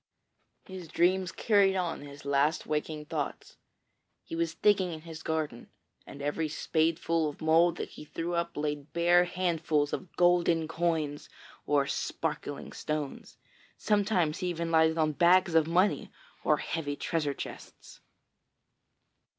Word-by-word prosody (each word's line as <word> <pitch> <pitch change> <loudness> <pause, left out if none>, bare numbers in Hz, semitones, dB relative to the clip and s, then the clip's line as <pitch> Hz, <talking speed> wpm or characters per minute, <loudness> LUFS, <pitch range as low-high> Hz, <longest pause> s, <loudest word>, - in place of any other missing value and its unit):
His 185 -3 -8
dreams 180 +3 +2
carried 200 -3 +3
on 180 -3 -2
his 145 0 -11
last 140 +3 +1
waking 150 0 -3
thoughts. - - -5 0.7
He - - -7
was 165 -1 -1
digging 195 -4 +3
in 160 -1 -7
his 160 -1 -9
garden, 155 -7 -3 0.4
and 140 - -9
every 155 +2 -1
spadeful 160 0 0
of 145 - -10
mould 165 +2 +3
that - - -4
he - - -11
threw 165 +3 -4
up 170 -2 -2
laid 150 -1 -3
bare 175 +1 +4
handfuls 165 -5 0
of 185 - -5
golden 175 -2 +3
coins 160 -3 -1 0.4
or 145 -1 +3
sparkling - - -3
stones. 150 -2 -5 0.4
Sometimes 200 -7 +1
he 180 - -2
even 170 -1 -2
lighted 160 0 +4
on 155 -1 +2
bags 175 +3 +4
of 160 -1 +4
money 180 +5 +1 0.3
or - - +3
heavy 145 -3 -3
treasure 150 -2 -1
chests. - - -9
165 Hz, 135 wpm, -29 LUFS, 150-175 Hz, 0.7 s, bare